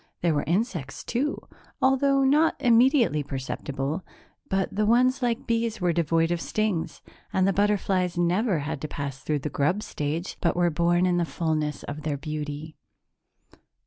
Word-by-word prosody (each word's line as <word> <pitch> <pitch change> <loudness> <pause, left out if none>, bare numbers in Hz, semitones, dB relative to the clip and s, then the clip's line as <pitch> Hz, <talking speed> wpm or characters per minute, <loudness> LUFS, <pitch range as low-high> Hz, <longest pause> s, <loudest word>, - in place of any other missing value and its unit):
There 170 -2 +2
were 145 - 0
insects, 170 - -2
too, 275 +5 -1 0.4
although 275 +1 +3
not 295 +4 +4
immediately 240 - +4
perceptible 135 +3 -4 0.5
but 195 -1 -1
the 210 +1 +1
ones 255 +3 +3
like 240 0 -1
bees 230 -1 0
were 175 -2 +1
devoid 165 0 +1
of 175 -1 -1
stings 180 -7 -2 0.3
and 190 0 +2
the 195 - +2
butterflies 195 -3 +1
never 180 +3 +2
had 150 0 -4
to 155 - -3
pass 140 -2 -5
through 150 +1 -1
the - - 0
grub 175 +9 0
stage 155 +5 -4
but 170 - +1
were 175 -1 +2
born 175 +3 +2
in 180 -1 +2
the 175 - +2
fullness 155 -3 -2
of 145 +1 -6
their 150 -1 -2
beauty. 150 +1 -5
175 Hz, 160 wpm, -26 LUFS, 150-220 Hz, 0.5 s, not